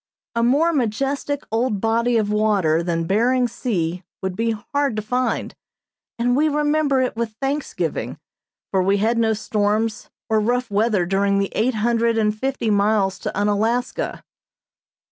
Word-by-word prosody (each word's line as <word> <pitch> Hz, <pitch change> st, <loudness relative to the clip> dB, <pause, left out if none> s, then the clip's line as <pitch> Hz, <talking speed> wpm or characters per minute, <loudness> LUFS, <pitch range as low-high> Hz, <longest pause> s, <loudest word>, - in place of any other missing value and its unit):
A 235 Hz, -, 0 dB
more 290 Hz, +8 st, +3 dB
majestic 275 Hz, +3 st, -1 dB
old 225 Hz, -2 st, 0 dB
body 230 Hz, +2 st, +1 dB
of 210 Hz, -2 st, 0 dB
water 200 Hz, -7 st, +2 dB
than 165 Hz, -1 st, -1 dB
Behring 245 Hz, +7 st, +2 dB
Sea 180 Hz, -8 st, -2 dB, 0.2 s
would 190 Hz, -1 st, -2 dB
be 230 Hz, +2 st, 0 dB
hard 265 Hz, +4 st, -1 dB
to 215 Hz, -, -1 dB
find; 250 Hz, +4 st, -1 dB, 0.6 s
and 245 Hz, +1 st, +1 dB
we 305 Hz, +3 st, +3 dB
remember 295 Hz, -2 st, +2 dB
it 255 Hz, -, -2 dB
with 230 Hz, -1 st, -3 dB
thanksgiving, 275 Hz, +2 st, -2 dB, 0.5 s
for 190 Hz, -, +2 dB
we 195 Hz, +2 st, +2 dB
had 225 Hz, +3 st, +1 dB
no 225 Hz, -1 st, +2 dB
storms 215 Hz, +1 st, -1 dB, 0.2 s
or 220 Hz, -1 st, +2 dB
rough 245 Hz, +2 st, 0 dB
weather 205 Hz, -3 st, +2 dB
during 200 Hz, +2 st, +1 dB
the 200 Hz, 0 st, 0 dB
eight 235 Hz, +3 st, 0 dB
hundred 230 Hz, +1 st, +1 dB
and 210 Hz, -1 st, +1 dB
fifty 255 Hz, -1 st, -1 dB
miles 200 Hz, -2 st, +2 dB
to -, -, -3 dB
Unalaska. 215 Hz, +4 st, -1 dB
225 Hz, 150 wpm, -21 LUFS, 205-250 Hz, 0.6 s, more